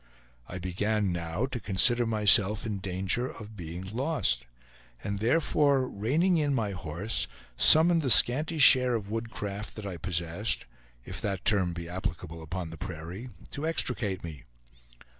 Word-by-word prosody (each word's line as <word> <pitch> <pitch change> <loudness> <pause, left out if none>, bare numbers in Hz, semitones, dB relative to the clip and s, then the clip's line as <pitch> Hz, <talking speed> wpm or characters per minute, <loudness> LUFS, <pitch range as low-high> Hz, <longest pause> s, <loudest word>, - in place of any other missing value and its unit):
I 95 - -7
began 100 +3 -2
now 85 +6 -3
to 130 -2 -6
consider 115 +4 +2
myself 105 0 +4
in 105 -3 -4
danger 95 +6 -2
of 110 -1 -11
being 85 -1 -8
lost; 110 - -2 0.6
and 100 0 -4
therefore, 140 +2 +1
reining 160 - 0
in 145 -2 0
my 110 -5 -2
horse, 90 +4 -2 0.3
summoned 165 - +6
the 135 - -2
scanty 150 +7 +5
share 130 -3 +7
of 105 -2 -5
woodcraft 105 -2 -5
that 110 - -8
I 95 -3 -6
possessed 85 +5 -3 0.4
(if - - -7
that 100 -2 -4
term 95 -5 +1
he 85 -1 -7
applicable 85 -2 -6
upon 85 +1 -6
the 80 - -10
prairie) 90 +6 -8 0.2
to 145 +3 -4
extricate 120 - -1
me. 80 -6 -9
105 Hz, 145 wpm, -27 LUFS, 90-125 Hz, 0.6 s, share